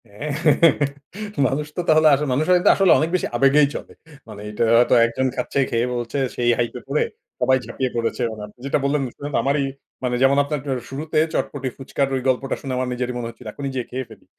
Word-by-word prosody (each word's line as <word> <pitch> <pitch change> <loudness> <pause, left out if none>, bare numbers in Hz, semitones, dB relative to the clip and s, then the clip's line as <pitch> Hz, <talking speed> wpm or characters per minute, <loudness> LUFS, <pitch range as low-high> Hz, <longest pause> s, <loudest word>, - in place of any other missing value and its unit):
হ্যাঁ, 105 +10 -6 1.2
মানুষ 145 +4 -2
তো - - +1
তাহলে 155 0 +6
আসলে 145 +2 +1
মানুষ 145 +5 +1
হয়ত 180 0 +3
আসলে 195 -2 +4
অনেক 160 - 0
বেশি 180 - 0
আবেগেই 140 +3 +5
চলে। - - -7 0.4
মানে 105 -2 -10
এটা 105 +2 -1
হয়তো 120 +1 +4
একজন 125 +3 -1
খাচ্ছে, 125 +2 -2
খেয়ে 115 +1 0
বলছে। 120 +2 -3 0.2
সেই 120 -1 +1
হাইপ 120 - -1
এ - - -15
পড়ে 145 +2 +1 0.4
সবাই 130 +1 +3
ঝাঁপিয়ে 130 +3 -2
পড়েছে। 115 +2 -1
মানে 110 -1 -8
আপনি 105 - -20
যেটা 140 - +1
বললেন 140 +1 +1 0.2
শুনে 145 - -5
তো - - +2
আমারই, 140 +1 +1 0.4
মানে 125 -1 0
যেমন 135 +1 +4
আপনার 145 +1 -3 0.3
শুরুতে 150 +4 -4 0.2
চটপটি 135 -2 -2
ফুচকার 135 +1 -1
ওই 130 - -1
গল্পটা 130 +1 0
শুনে 135 -2 -4
আমার 130 0 -1
নিজেরই 125 0 -3
মনে 120 -1 -4
হচ্ছিল। 115 +1 -14
এখনই 140 +4 -5
যেয়ে 125 -2 -3
খেয়ে 130 +1 -3
ফেলি। - - -15
130 Hz, 210 wpm, -22 LUFS, 120-145 Hz, 1.2 s, তাহলে